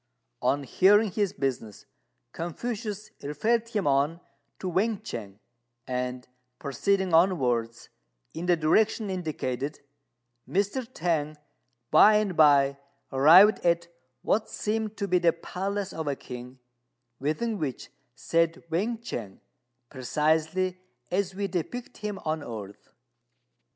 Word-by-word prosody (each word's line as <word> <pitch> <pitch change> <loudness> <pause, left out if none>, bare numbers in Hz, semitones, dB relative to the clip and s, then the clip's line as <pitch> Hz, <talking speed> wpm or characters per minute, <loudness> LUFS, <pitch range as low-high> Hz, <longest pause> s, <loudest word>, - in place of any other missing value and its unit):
On 140 +1 +1
hearing 200 - +4
his 205 0 0
business, 125 -6 -4 0.5
Confucius 210 - -5
referred 220 +11 0
him 210 -4 -1
on 145 +4 +2 0.4
to 190 - -5
Wên 205 +4 0
ch'ang; 100 - -7 0.5
and, 125 0 -3 0.3
proceeding 185 +7 0
onwards 125 -10 +2 0.4
in 170 +2 -5
the 175 - +5
direction 205 +6 +2
indicated, 150 -6 -3 0.7
Mr. 205 +6 -1
T'ang 155 -6 -1 0.5
by 210 +7 +7
and 210 -4 +1
by 140 -3 +5 0.3
arrived 165 +11 +7
at 170 0 +1 0.3
what 220 +1 +1
seemed 220 0 -2
to 200 - -2
be 180 -1 +3
the 170 -1 +3
palace 195 +3 -4
of 160 -1 -4
a 140 - 0
king, 125 0 -9 0.6
within 195 - -1
which 135 -6 -4 0.2
sat 165 0 +1 0.2
Wên 210 +8 0
ch'ang, 105 - -6 0.5
precisely 160 +7 0 0.3
as 190 0 0
we 200 +1 -2
depict 195 +7 -5
him 210 -1 -4
on 155 0 -1
earth. 105 -7 -8
170 Hz, 115 wpm, -27 LUFS, 140-200 Hz, 0.7 s, by